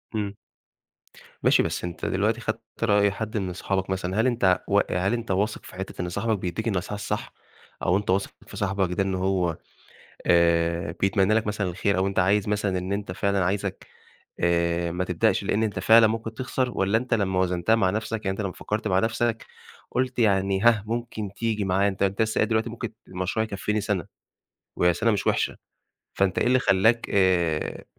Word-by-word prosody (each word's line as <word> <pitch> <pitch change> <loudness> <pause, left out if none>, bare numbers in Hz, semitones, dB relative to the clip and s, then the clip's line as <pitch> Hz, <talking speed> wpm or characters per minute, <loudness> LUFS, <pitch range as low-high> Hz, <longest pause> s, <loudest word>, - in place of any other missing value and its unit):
إمم. 100 -2 -2 1.1
ماشي، - - +5
بس - - -3
أنت 90 -1 -5
دلوقتي 105 +5 0
خدت 110 0 -2 0.2
رأي 100 -2 +4
حد 110 +2 -4
من 95 -3 -2
صحابك 95 +1 -2
مثلًا، 95 +2 -1
هل 120 - +2
أنت 100 -7 +2
و - - +4
هل 90 +4 +1
أنت 115 -3 -3
واثق 105 +3 -1
في - - -12
حتّة 95 0 -6
إن 90 - -3
صاحبك 105 +4 -1
بيدّيك 90 +5 -3
النصيحة 100 -1 -2
الصح؟ 105 - -4 0.5
أو 90 - +3
أنت 105 - -5
واثق 95 +1 +1 0.2
في - - -10
صاحبك 95 -2 0
ده 95 - +3
إن 95 -1 -1
هو 90 -3 0 0.7
آآ 85 +1 +3
بيتمنّى 95 +1 +3
لك 110 -1 +1
مثلًا 100 -2 -1
الخير 100 +3 0
أو 95 - +2
أنت 100 0 -2
عايز 100 +3 +2
مثلًا 105 -3 0
إن 90 +2 -4
أنت 100 -2 -3
فعلًا 100 0 0
عايزك 95 +1 -2 0.5
آآ 85 0 +1
ما 90 +2 -1
تبدأش 95 +3 +1
لإن 105 +3 +1
أنت 105 -4 -1
فعلًا 110 +4 +6
ممكن 115 +1 -3
تخسر 130 +1 -1
والّا 100 +3 +3
أنت 125 +1 -1
لمّا 95 -4 +1
وزنتها 90 +3 +2
مع 95 -5 +2
نَفْسك، 110 +2 -3
يعني 95 - 0
أنت 95 - -3
لمّا 100 -2 -3
فكّرت 105 +3 -3
مع 95 -1 +2
نفسك 115 +1 0 0.4
قُلت 125 0 -1
يعني 95 -3 +2
ها، 110 -2 +4
ممكن 115 -2 -4
تيجي 110 -2 -1
معايا، 95 +2 +2
أنت 100 0 -3
أنت 100 +2 +1
لسّه 110 0 0
قايل - - +2
دلوقتي 110 0 0
ممكن 115 -1 -6 0.2
المشروع 95 +4 -1
يكفّيني 105 0 -2
سَنة 100 -5 -2 0.7
وهي 90 0 +3
سَنة 115 +6 +1
مش 100 -2 -1
وِحشة، - - +1 0.6
فأنت 95 -1 +1
إيه - - +2
اللي 130 +1 +4
خلّاك 110 +3 +3
آآ 90 -5 +1
100 Hz, 190 wpm, -25 LUFS, 95-110 Hz, 1.1 s, فعلًا